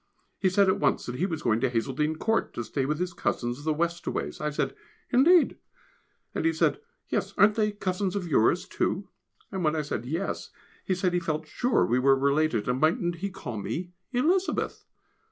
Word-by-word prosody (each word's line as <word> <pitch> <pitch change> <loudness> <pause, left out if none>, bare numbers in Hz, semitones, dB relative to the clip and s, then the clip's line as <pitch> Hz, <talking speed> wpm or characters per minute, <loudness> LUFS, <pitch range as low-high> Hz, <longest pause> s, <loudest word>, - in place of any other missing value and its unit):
He 190 - +3
said 195 +1 +4
at 190 - +2
once 145 - +1
that 120 - -4
he 185 - +1
was 160 -4 -4
going 110 -2 +2
to 130 +1 +1
Hazeldene 135 +6 0
Court, 225 +6 0
to 120 - -2
stay 135 +3 -2
with 150 +1 0
his 180 +1 -2
cousins 120 -5 -2
the 155 - +1
Westaways. 170 +2 -2
I 150 - 0
said, 150 - -2 0.4
"Indeed!" 315 +7 +5 0.7
and - - -2
he 330 - +3
said, - - +2 0.3
"Yes, - - -2
aren't 210 +1 +6
they 210 -1 +1
cousins 190 -1 -2
of 190 -3 -2
yours 130 -8 +3
too?" - - -1 0.4
and 190 -2 -3
when 155 0 +2
I 155 - 0
said 125 -5 -4
"Yes," 165 +8 -3 0.4
he 185 - +1
said 180 0 0
he 175 - +2
felt 160 -2 -2
sure 245 +11 +1
we 125 +2 +2
were 135 +1 +5
related, 140 -4 +1
and 125 +1 0
mightn't 170 +2 +2
he 200 +4 -3
call 120 - -6
me 175 - -4 0.2
Elizabeth!!! 340 +10 0
165 Hz, 195 wpm, -27 LUFS, 140-195 Hz, 0.7 s, aren't